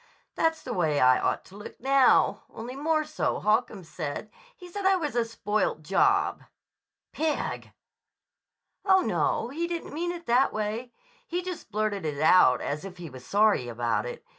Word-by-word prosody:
"That's 325 Hz, -1 st, 0 dB
the 250 Hz, -, -4 dB
way 155 Hz, -7 st, +1 dB
I 130 Hz, 0 st, +5 dB
ought -, -, -1 dB
to 190 Hz, -, -15 dB
look 205 Hz, -, -10 dB
now, 270 Hz, +1 st, +4 dB
only 240 Hz, +3 st, -8 dB
more 310 Hz, +2 st, +1 dB
so, 305 Hz, 0 st, -2 dB
Holcomb 215 Hz, -2 st, 0 dB
said. 160 Hz, +5 st, -6 dB, 0.3 s
He 360 Hz, -, -11 dB
said 400 Hz, +3 st, -6 dB
I 385 Hz, 0 st, +4 dB
was 300 Hz, -8 st, -3 dB
a 240 Hz, -, +3 dB
spoilt 215 Hz, -7 st, -2 dB
job." 395 Hz, -, +2 dB, 0.7 s
"Pig!" 315 Hz, -1 st, -2 dB, 1.1 s
"Oh, 380 Hz, -1 st, +5 dB
no. 240 Hz, -, 0 dB
He 330 Hz, +6 st, -3 dB
didn't 340 Hz, -1 st, -5 dB
mean 345 Hz, +3 st, -2 dB
it 345 Hz, -1 st, -8 dB
that 250 Hz, +3 st, +3 dB
way. 215 Hz, +3 st, -3 dB, 0.4 s
He 355 Hz, +1 st, -2 dB
just 365 Hz, -, -7 dB
blurted 210 Hz, -2 st, -1 dB
it 150 Hz, -3 st, -3 dB
out 155 Hz, -5 st, +5 dB
as 150 Hz, +1 st, -3 dB
if 190 Hz, -2 st, -9 dB
he 170 Hz, -4 st, -8 dB
was 130 Hz, -1 st, -11 dB
sorry 205 Hz, -, +2 dB
about 120 Hz, -, -1 dB
it. -, -, -8 dB
230 Hz, 170 wpm, -27 LUFS, -, 1.1 s, I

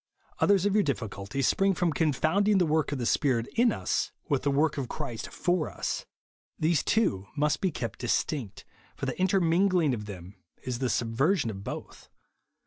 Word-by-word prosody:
Others 200 Hz, -2 st, +4 dB
of 205 Hz, -, +2 dB
youi 210 Hz, 0 st, +4 dB
difficulties 115 Hz, -2 st, -2 dB
spring 195 Hz, -1 st, +2 dB
from 170 Hz, -3 st, +1 dB
con 155 Hz, +2 st, +2 dB
founding 200 Hz, +9 st, +2 dB
tlie 180 Hz, -3 st, +3 dB
work 155 Hz, -1 st, +1 dB
of 145 Hz, -, -1 dB
the 120 Hz, -, -3 dB
Spirit 125 Hz, -3 st, +2 dB
in 235 Hz, 0 st, +4 dB
us -, -, -1 dB, 0.2 s
with 140 Hz, -4 st, +1 dB
the 145 Hz, -, 0 dB
work 145 Hz, +2 st, +1 dB
of 130 Hz, -, -4 dB
Christ 135 Hz, -7 st, -5 dB
for 175 Hz, -3 st, 0 dB
us. -, -, -4 dB, 0.5 s
These 160 Hz, -2 st, +2 dB
two 100 Hz, -, +1 dB
must 150 Hz, 0 st, +1 dB
be 190 Hz, -, +2 dB
kept 120 Hz, -7 st, -5 dB
distinct; 120 Hz, -2 st, -2 dB, 0.3 s
for -, -, -4 dB
the -, -, -4 dB
intermingling 185 Hz, -3 st, +3 dB
of 105 Hz, -3 st, -4 dB
them 95 Hz, -1 st, -9 dB, 0.3 s
is 125 Hz, -2 st, -3 dB
the 130 Hz, -2 st, 0 dB
subversion 120 Hz, -, +1 dB
of 95 Hz, -1 st, -8 dB
both. -, -, -8 dB
150 Hz, 180 wpm, -28 LUFS, 120-180 Hz, 0.5 s, Others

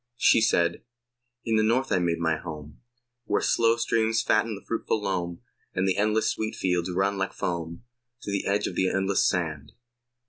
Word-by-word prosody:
She 115 Hz, -, +5 dB
said: 85 Hz, -6 st, +2 dB, 0.6 s
In 115 Hz, -1 st, +2 dB
the 110 Hz, -, +3 dB
North 125 Hz, +5 st, +1 dB
I 95 Hz, -, +3 dB
made 85 Hz, -1 st, 0 dB
my 80 Hz, -1 st, +1 dB
home, 75 Hz, -2 st, -9 dB, 0.4 s
Where 105 Hz, -, +1 dB
slow 115 Hz, 0 st, +2 dB
streams 115 Hz, -1 st, +1 dB
fatten 110 Hz, 0 st, +1 dB
the 100 Hz, -, -12 dB
fruitful 115 Hz, -1 st, -1 dB
loam, 90 Hz, -4 st, -3 dB, 0.3 s
And 95 Hz, +1 st, +1 dB
the 95 Hz, -, +1 dB
endless 110 Hz, +1 st, +1 dB
wheat 110 Hz, 0 st, -2 dB
fields 90 Hz, -1 st, 0 dB
run 95 Hz, +2 st, 0 dB
like 95 Hz, -, -2 dB
foam 85 Hz, +1 st, -4 dB, 0.4 s
To 100 Hz, -, -4 dB
the 100 Hz, -, -2 dB
edge 100 Hz, +1 st, +1 dB
of -, -, -3 dB
the 95 Hz, +1 st, +1 dB
endless 95 Hz, 0 st, +1 dB
sand. 80 Hz, -6 st, -3 dB
95 Hz, 180 wpm, -26 LUFS, 85-110 Hz, 0.6 s, She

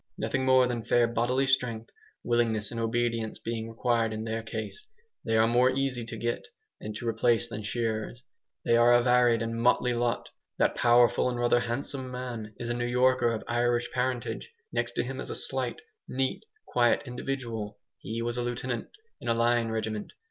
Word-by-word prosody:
Nothing 135 Hz, -1 st, -1 dB
more 130 Hz, -1 st, +6 dB
than 120 Hz, -2 st, -2 dB
fair 120 Hz, +1 st, +3 dB
bodily 120 Hz, +3 st, +1 dB
strength, 125 Hz, -4 st, 0 dB, 0.3 s
willingness 115 Hz, -3 st, +1 dB
and 115 Hz, -, -4 dB
obedience 115 Hz, -1 st, -1 dB
being 115 Hz, -1 st, -4 dB
required 115 Hz, -1 st, +1 dB
in 110 Hz, 0 st, -4 dB
their 115 Hz, 0 st, -2 dB
case, 115 Hz, -, -6 dB, 0.4 s
they 115 Hz, 0 st, +1 dB
are 110 Hz, -, +5 dB
more 120 Hz, +2 st, +4 dB
easy 130 Hz, -2 st, -1 dB
to 115 Hz, -, -6 dB
get 120 Hz, +2 st, -2 dB, 0.4 s
and 105 Hz, 0 st, -6 dB
to 115 Hz, +2 st, -5 dB
replace 115 Hz, +1 st, +2 dB
than 110 Hz, -2 st, -6 dB
shearers. 110 Hz, +2 st, -2 dB, 0.4 s
They 115 Hz, -, +4 dB
are 120 Hz, +1 st, +6 dB
a 120 Hz, 0 st, +5 dB
varied 125 Hz, -2 st, +4 dB
and 115 Hz, 0 st, -3 dB
motley 125 Hz, 0 st, +3 dB
lot. 120 Hz, 0 st, -1 dB, 0.3 s
That -, -, +3 dB
powerful 120 Hz, +1 st, +4 dB
and 120 Hz, -1 st, -3 dB
rather 120 Hz, 0 st, +3 dB
handsome 130 Hz, +2 st, -3 dB
man 120 Hz, -4 st, -6 dB
is 120 Hz, 0 st, -4 dB
a -, -, +1 dB
New 120 Hz, 0 st, -1 dB
Yorker, 125 Hz, -1 st, +3 dB
of 110 Hz, -, -3 dB
Irish 120 Hz, 0 st, +1 dB
parentage. 125 Hz, -, -2 dB, 0.2 s
Next -, -, -1 dB
to -, -, 0 dB
him -, -, -5 dB
is -, -, -5 dB
a -, -, -3 dB
slight, -, -, -2 dB, 0.3 s
neat, 130 Hz, -, -1 dB, 0.2 s
quiet 120 Hz, +2 st, +2 dB
individual. 120 Hz, -4 st, -4 dB, 0.2 s
He 115 Hz, +3 st, -4 dB
was 120 Hz, +1 st, -2 dB
a -, -, 0 dB
lieutenant 120 Hz, 0 st, -3 dB, 0.3 s
in -, -, -8 dB
a 115 Hz, -, +2 dB
line 115 Hz, 0 st, +2 dB
regiment. 110 Hz, -1 st, -3 dB
120 Hz, 185 wpm, -28 LUFS, 115-125 Hz, 0.4 s, more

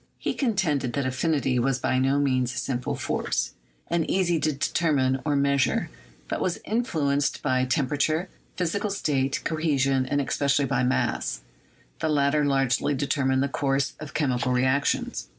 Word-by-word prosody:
He -, -, -2 dB
contended 175 Hz, -, 0 dB
that 140 Hz, -2 st, -1 dB
affinity 130 Hz, -1 st, 0 dB
was 130 Hz, +1 st, +1 dB
by 130 Hz, 0 st, 0 dB
no 135 Hz, +2 st, +2 dB
means 130 Hz, -3 st, +1 dB
a -, -, -6 dB
simple 125 Hz, -2 st, -2 dB
force, -, -, -1 dB, 0.4 s
and 170 Hz, -2 st, 0 dB
easy 175 Hz, -3 st, +2 dB
to 155 Hz, +1 st, +1 dB
determine 135 Hz, -2 st, +1 dB
or 150 Hz, -2 st, 0 dB
measure; 140 Hz, -1 st, +1 dB, 0.4 s
but -, -, -3 dB
was 180 Hz, -, 0 dB
influ 175 Hz, -, 0 dB
enced 145 Hz, 0 st, -1 dB
by 130 Hz, -2 st, +2 dB
temperature, 145 Hz, +6 st, 0 dB, 0.3 s
physical 190 Hz, +4 st, -1 dB
state, 135 Hz, -8 st, -1 dB
cohesion, 140 Hz, -5 st, +1 dB
and 145 Hz, +2 st, 0 dB
espe 140 Hz, +1 st, -1 dB
cially 140 Hz, 0 st, +3 dB
by 135 Hz, -1 st, +1 dB
mass. -, -, 0 dB, 0.6 s
The 160 Hz, -, 0 dB
latter 145 Hz, 0 st, +2 dB
largely 135 Hz, 0 st, +1 dB
determined 135 Hz, -1 st, +1 dB
the -, -, +1 dB
course 140 Hz, -1 st, 0 dB
of 155 Hz, -2 st, -9 dB
chemical 125 Hz, -4 st, 0 dB
reactions. 130 Hz, +3 st, 0 dB
140 Hz, 155 wpm, -26 LUFS, 130-155 Hz, 0.6 s, cially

